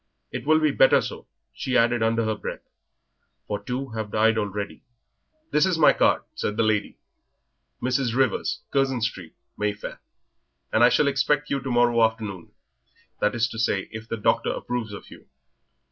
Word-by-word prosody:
It -, -, -6 dB
will 155 Hz, 0 st, +5 dB
be 155 Hz, -1 st, +2 dB
better 135 Hz, -, +5 dB
so," -, -, -6 dB, 0.3 s
she 130 Hz, -, -1 dB
added 120 Hz, 0 st, +3 dB
under 115 Hz, 0 st, +1 dB
her 110 Hz, -, 0 dB
breath, 105 Hz, -, -7 dB, 0.8 s
"for 105 Hz, -1 st, -3 dB
two 130 Hz, +4 st, -4 dB
have 110 Hz, -2 st, -5 dB
died 110 Hz, +2 st, +3 dB
already." 105 Hz, -2 st, -3 dB, 0.7 s
"This 150 Hz, -, +3 dB
is 185 Hz, -2 st, +2 dB
my 155 Hz, -, +6 dB
card," -, -, +2 dB
said 105 Hz, -, -3 dB
the 115 Hz, -, +3 dB
lady 110 Hz, -2 st, 0 dB, 0.9 s
"Mrs. 125 Hz, -2 st, 0 dB
Rivers, 130 Hz, -5 st, 0 dB
Curzon 135 Hz, -3 st, +1 dB
Street, 95 Hz, -8 st, -4 dB, 0.2 s
Mayfair 105 Hz, -1 st, -3 dB, 0.7 s
and 110 Hz, -, +4 dB
I 120 Hz, -, +8 dB
shall 145 Hz, -, +3 dB
expect 140 Hz, +2 st, +1 dB
you 140 Hz, -, +1 dB
to 130 Hz, -, -5 dB
morrow 120 Hz, -1 st, +3 dB
afternoon 110 Hz, -5 st, -2 dB, 0.7 s
that 105 Hz, +2 st, +1 dB
is 120 Hz, 0 st, +2 dB
to 110 Hz, -, -7 dB
say, 100 Hz, -3 st, 0 dB
if 110 Hz, 0 st, -8 dB
the 115 Hz, -, -2 dB
doctor 105 Hz, -, +1 dB
approves 120 Hz, -3 st, -4 dB
of 100 Hz, -, -10 dB
you. -, -, -14 dB
115 Hz, 170 wpm, -25 LUFS, 110-130 Hz, 0.9 s, I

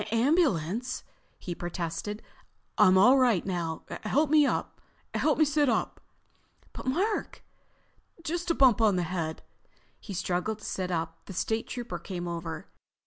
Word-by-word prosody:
"Ambulance?" 235 Hz, -, +1 dB, 0.3 s
he 175 Hz, -, -5 dB
protested. 175 Hz, +4 st, -4 dB, 0.5 s
"I'm 190 Hz, -3 st, +6 dB
all 250 Hz, +8 st, +7 dB
right 240 Hz, -8 st, +3 dB
now. 170 Hz, -4 st, -3 dB, 0.2 s
Help 285 Hz, +7 st, +1 dB
me—sit 300 Hz, 0 st, +1 dB
up." 230 Hz, -, -1 dB, 0.7 s
"But -, -, -8 dB
Mark——" 385 Hz, +11 st, -1 dB, 0.8 s
"Just 345 Hz, +2 st, -3 dB
a 335 Hz, -, +2 dB
bump 250 Hz, -5 st, +5 dB
on 210 Hz, -3 st, +4 dB
the 180 Hz, -, +1 dB
head." 165 Hz, -2 st, -3 dB, 0.6 s
He 200 Hz, -, -7 dB
struggled 185 Hz, +4 st, -1 dB
to 215 Hz, -, -12 dB
sit 185 Hz, -1 st, -3 dB
up. 165 Hz, -1 st, -3 dB
The 195 Hz, -, -7 dB
State 220 Hz, +5 st, -1 dB
Trooper 235 Hz, -8 st, -5 dB
came 175 Hz, -1 st, -5 dB
over. 170 Hz, 0 st, -5 dB
205 Hz, 130 wpm, -28 LUFS, 175-260 Hz, 0.8 s, all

